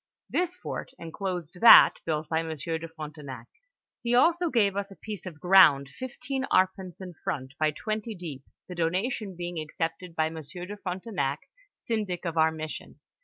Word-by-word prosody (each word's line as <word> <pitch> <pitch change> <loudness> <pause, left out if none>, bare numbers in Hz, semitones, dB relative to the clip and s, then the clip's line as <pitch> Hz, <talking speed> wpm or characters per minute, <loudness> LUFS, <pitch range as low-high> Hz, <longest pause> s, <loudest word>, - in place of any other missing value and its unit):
This 360 0 0
fort - - -6
enclosed 180 0 -5
that 235 - +10
built 155 -1 -1
by 160 +1 +1
Monsieur 160 0 -3
de 165 - -6
Frontenac. 150 -6 -8 0.6
He 240 0 +1
also 340 +6 +4
gave 205 -7 +2
us 200 0 -2
a 195 - -12
piece 210 -2 -7
of 160 -4 -9
ground 165 -7 +6
fifteen 260 - -4
arpents 185 -1 +1
in 180 -1 -7
front, 130 -1 -3
by 155 0 +3
twenty 215 +7 -4
deep, 160 -7 -7 0.3
the 180 - -7
donation 185 +4 -1
being 175 -1 -4
accepted 165 +3 -4
by 160 -1 +1
Monsieur 160 +2 -6
de 205 +3 -7
Frontenac, 180 -7 -3 0.3
syndic 210 -6 -3
of 170 -1 -2
our 160 0 +4
mission. 155 -1 -7
175 Hz, 165 wpm, -28 LUFS, 160-205 Hz, 0.6 s, that